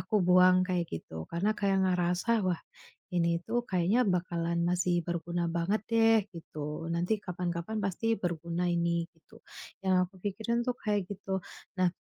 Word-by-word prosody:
aku 210 -3 +1
buang, 180 +1 +6
kayak 180 -2 0
gitu, 80 0 -6
karena 180 +5 +1
kayak 195 -1 +2
ngerasa, 180 +4 +1
"Wah 175 -2 0 0.5
ini 170 -1 +2
tuh 240 +2 0
kayaknya 190 +6 +2
bakalan 170 -2 0
masih 175 -1 +1
berguna 170 0 -2
banget 170 +6 +1
deh." 225 0 +5
Gitu, 155 -1 -6
"nanti 175 +6 0
kapan-kapan 180 +3 -3
pasti 200 +4 0
berguna 175 -1 -2
ini." 170 -1 +1
Gitu. 165 -2 -20 0.5
Yang 190 - +4 0.2
aku - - -29
pikirin 220 +4 -1
tuh 250 - +1
kayak 205 -4 0
gitu. 195 -1 -3 0.4
Nah, 185 -1 +4
180 Hz, 150 wpm, -30 LUFS, 170-200 Hz, 0.5 s, buang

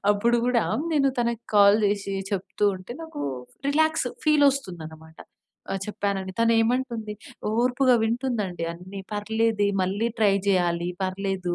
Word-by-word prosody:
అప్పుడు 235 +4 +2
గూడా 245 -2 +2 0.3
నేను 275 -3 +3
తనకి 235 -1 -1
కాల్ 205 +1 +7
జేసీ 200 -1 -1 0.2
చెప్తూ 195 +2 -2
ఉంటే, 185 +6 -9
నాకూ 320 - -7 0.5
రిలాక్స్ 315 +2 +2 0.2
ఫీలొస్తుందనమాట 180 - 0 0.5
ఆహ్, 195 - -1
చెప్పానని. 195 -2 -3
తనేమంటుంది, 230 -1 +1 0.5
ఓర్పుగా 250 +1 +3
వింటుందండి 225 -7 -1
అన్నీ. 185 +3 -9
"పర్లేదే 215 0 +1
మళ్ళీ 200 +5 0
ట్రై 205 -3 +4
జెయ్యాలి, 175 -2 +1
పర్లేదు. 190 -1 -2
210 Hz, 115 wpm, -25 LUFS, 190-240 Hz, 0.5 s, కాల్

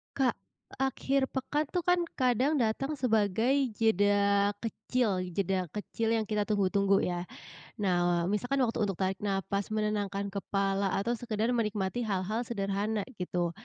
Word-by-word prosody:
Kak, 265 -3 +2 0.4
akhir 270 +1 0
pekan 285 +3 -1
tuh 360 - +1
kan 355 -1 +4 0.2
kadang 260 +4 +2
datang 270 +6 -1
sebagai 235 +3 +2
jeda 205 -1 +3
kecil, 225 -3 -1
jeda 185 -2 -1
kecil 220 +2 -2
yang 225 -2 +1
kita 210 0 +1
tunggu-tunggu 200 -1 +2
ya. 175 -1 -1 0.5
Nah 175 -3 +1
wa 180 - -1
misalkan 245 +6 +1
waktu 235 -1 -1
untuk 195 - -2
tarik 190 +1 -1
nafas 200 0 -1
menenangkan 205 -2 -1
kepala 195 -1 0
atau 200 +4 0
sekedar 230 -1 -1
menikmati 215 -1 -1
hal-hal 200 +2 -1
sederhana 205 0 -1 0.2
gitu, 175 -1 -1
210 Hz, 135 wpm, -30 LUFS, 195-240 Hz, 0.5 s, kan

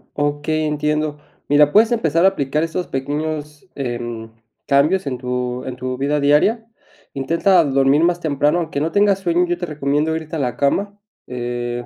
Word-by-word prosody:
Okey, 145 +2 -1
entiendo, 150 0 -1 0.3
mira, 145 0 +4
puedes 220 +5 +5
empezar 170 -7 +2
a - - +8
aplicar 150 -4 -1
esos 165 +2 -3
pequeños, 150 +3 -4
em, 120 -3 -5 0.4
cambios 150 +7 +2
en 130 -2 -2
tu 125 0 -3
en 130 - -5
tu 130 0 -4
vida 145 +3 0
diaria, 150 +11 +2 0.5
intenta 170 +6 +2
dormir 135 +1 +2
más 175 0 +2
temprano, 150 0 +1
aunque 160 -4 -3
no 160 +2 -1
tengas 205 -1 +3
sueño, 175 -1 +1
yo 175 0 -2
te 175 - -4
recomiendo 150 +1 -1
irte 160 0 -5
a - - -2
la 125 -3 -2
cama, 200 +9 0 0.3
eh, 120 -1 -4
150 Hz, 165 wpm, -19 LUFS, 135-165 Hz, 0.5 s, a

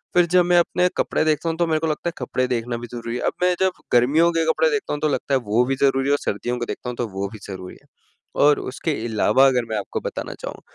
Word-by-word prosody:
फिर 175 -1 +6
जब 180 -1 +6
मैं 175 0 +3
अपने 180 +1 +2
कपड़े - - +1
देखता 155 +1 +1
हूँ 165 - -3
तो 170 0 +1
मेरे 160 -1 +1
को 160 - -1
लगता 155 +2 -2
है - - -9
कपड़े 130 0 -1
देखना 120 -1 -2
भी 120 +1 -7
ज़रूरी 115 0 -5
है - - -5
अब - - 0
मैं 180 0 +3
जब 190 -1 0
गर्मियों 145 +8 +4
के 165 -1 +1
कपड़े - - +2
देखता 435 -2 -2
हूँ 145 - -4
तो 155 - +2
लगता 140 0 -2
है - - +3
वो 115 +4 +3
भी 135 +1 0
ज़रूरी 135 -1 +2
है - - +3
और - - +3
सर्दियों 120 +5 -2
के 120 - -2
देखता 125 - -5
हूँ 125 - -5
तो 120 - -2
वो 100 -1 -4
भी 110 - -9
ज़रूरी 95 -2 -8
है। - - -28 0.6
और 150 0 +5
उसके 140 +5 -3
अलावा 115 +3 +3
अगर 125 -3 +1
मैं 110 - -1
आपको 100 - -4
बताना - - -5
चाहूँ - - -7
135 Hz, 280 wpm, -22 LUFS, 120-165 Hz, 0.6 s, फिर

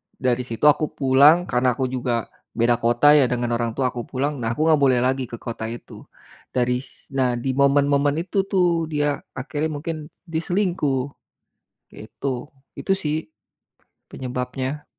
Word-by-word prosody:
dari 125 -1 0
situ 115 +4 -2
aku 150 +1 +3
pulang, 145 +5 +5
karena 125 0 +2
aku 130 -1 0
juga 120 -3 -1 0.3
beda 120 +1 +3
kota 120 +5 +4
ya, 140 - +5
dengan 120 -1 -1
orang 115 -1 -1
tua, 130 -2 +1
aku 120 -2 -5
pulang, 140 +2 -2
nah, 115 -1 -1
aku 155 +5 +1
gak 155 - +4
boleh 130 -3 +4
lagi 130 0 0
ke - - -6
kota 115 -2 -5
itu, 120 - -10 0.5
dari 125 0 +1
s 135 - -11
Nah, 125 -2 +2
di 130 +2 -1
momen-momen 140 +1 +3
itu 195 +2 -1
tuh, 175 -4 +1
dia 145 -1 0 0.2
akhirnya 145 +4 -2
mungkin 155 0 -5 0.2
dia 160 0 -2
selingkuh. 170 -9 0 0.8
Kayak - - -11
itu. 135 -2 -2 0.4
Itu - - -2
sih, 155 - -2 0.8
penyebabnya. 130 +3 -4
135 Hz, 160 wpm, -22 LUFS, 125-150 Hz, 0.8 s, pulang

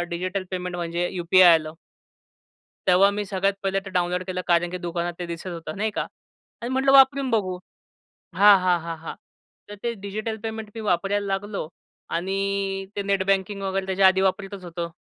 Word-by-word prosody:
Digital 185 +3 -3
payment 180 -1 -4
म्हणजे 175 +1 -2
UPI 180 0 +6
आलं. 155 -1 -1 1.2
तेव्हा 185 +2 +6
मी 205 0 -3
सगळ्यात 195 0 0
पहिले 195 0 +1
ते 195 - -6
डाउनलोड 180 0 0
केलं, 185 0 -3
कारण 175 0 +3
की 180 - -4
दुकानात 175 0 -3
ते 175 - -3
दिसत 170 +1 -7
होतं 165 -3 -6
नाही 215 +2 0
का. - - -2 0.6
आणि 235 - -4
म्हटलं 265 +1 +2
वापरून 270 0 +6
बघू. 195 -6 0 0.8
हां, 200 +2 +7
हां, 180 -1 +2
हां, 165 0 -5
हां. 160 - -7 0.5
तर 205 - -8
ते 235 -1 -1
डिजिटल 215 +2 -3
पेमेंट 220 -1 -5
मी 225 - -6
वापरायला 200 +1 0
लागलो. 195 -3 -3 0.5
आणि 190 +3 -1 0.6
ते 200 - -1
नेटबँकिंग 195 0 0
वगैरे 195 0 -2
त्याच्या 190 0 +3
आधी 190 0 +4
वापरतच 195 0 -1
होतो, 170 -1 -5
190 Hz, 170 wpm, -24 LUFS, 175-200 Hz, 1.2 s, हां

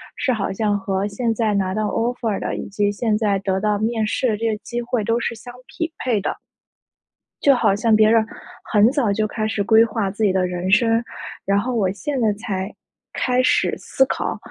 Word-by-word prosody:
是 280 - 0
好 215 -4 -2
像 205 0 0
和 195 0 -1
现 225 +3 -1
在 220 -2 0
拿 190 -2 0
到 215 +1 -1
Offer 230 -1 -1
的， - - -3
以 - - -5
及 205 +1 0
现 210 +1 0
在 210 -3 +1
得 190 -1 -1
到 210 +1 +1
面 220 0 0
试 250 +4 0
的 215 - 0
这 230 +2 -1
个 215 - -2
机 240 0 -4
会 240 -2 -1
都 230 +2 +1
是 235 - -2
相 245 +2 -11
匹 330 -2 -4
配 230 -6 0
的。 - - -3 1.1
就 280 - +6
好 200 -5 +2
像 220 +1 +3
别 215 0 +5
人 225 -1 +4 0.5
很 210 0 +5
早 270 -7 +1
就 215 +1 0
开 215 0 -2
始 205 -1 -1
规 220 +2 +6
划 215 -3 -2
自 210 +3 -3
己 205 - +4
的 185 -1 +2
人 180 +1 -3
生。 230 +2 +3 0.4
然 200 +1 +2
后 245 +4 -2
我 195 -5 +1
现 270 +7 -3
在 220 -2 +3
才 200 -1 -4 0.4
开 250 0 +1
始 - - +2
思 265 - +1
考 - - -3
215 Hz, 250 characters per minute, -21 LUFS, 200-235 Hz, 1.1 s, 就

